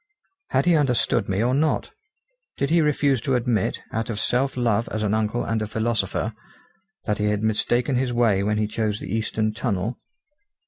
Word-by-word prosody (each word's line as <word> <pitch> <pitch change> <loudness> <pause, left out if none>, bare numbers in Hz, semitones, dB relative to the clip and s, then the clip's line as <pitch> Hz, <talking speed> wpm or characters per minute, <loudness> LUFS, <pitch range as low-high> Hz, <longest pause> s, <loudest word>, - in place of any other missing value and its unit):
Had - - +2
he 175 -1 +5
understood 135 -10 +1
me 100 +3 +1
or 125 +2 +2
not? 150 +3 +1 0.7
Did 140 - -1
he 170 0 +5
refuse 140 -4 +2
to 135 0 0
admit, 120 -5 0
out 115 +2 -2
of 105 -3 -2
self 130 +5 0
love 115 -2 +1
as 110 0 -2
an 105 0 +1
uncle 110 +2 0
and 115 -1 -1
a 110 - -2
philosopher, 110 -1 -1 0.7
that 105 -1 -1
he 105 - +1
had 105 0 0
mistaken 120 +4 +1
his 125 0 0
way 115 -5 +2
when 105 +1 0
he 105 - +1
chose 105 0 -2
the - - -6
eastern 110 -1 -1
tunnel? 110 0 -2
115 Hz, 185 wpm, -24 LUFS, 105-125 Hz, 0.7 s, he